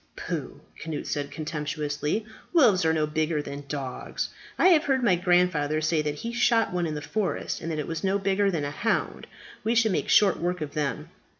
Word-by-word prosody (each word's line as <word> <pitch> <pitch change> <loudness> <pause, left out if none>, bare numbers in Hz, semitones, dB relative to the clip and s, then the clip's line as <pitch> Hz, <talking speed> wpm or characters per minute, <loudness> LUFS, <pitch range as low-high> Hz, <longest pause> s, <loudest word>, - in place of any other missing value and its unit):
"Pooh!" - - -5 0.2
Cnut 160 -2 -4
said 145 -1 -2
contemptuously. 150 +4 -3 0.3
"Wolves 215 - +5
are 160 - +4
no 155 -1 +1
bigger 155 +1 0
than 140 0 -7
dogs. 135 -3 -4 0.3
I 370 - +6
have 320 -4 +5
heard 265 -2 +1
my 210 -6 +4
grandfather 175 -4 +2
say 155 0 +1
that 150 -1 -2
he 230 +10 -5
shot 230 -3 +2
one 175 -1 0
in 155 - -3
the 150 - -5
forest, 195 +7 -2
and 165 - -4
that 155 - -2
it 150 - -2
was 165 +2 -4
no 195 +1 +2
bigger 195 0 +1
than 160 -6 -1
a 145 - -3
hound. 225 +9 -1 0.4
We 225 +2 +1
should 225 -2 +4
make - - -1
short 200 -3 +5
work 180 +1 -1
of 150 -2 -5
them." 150 +1 -2
165 Hz, 205 wpm, -26 LUFS, 150-200 Hz, 0.4 s, I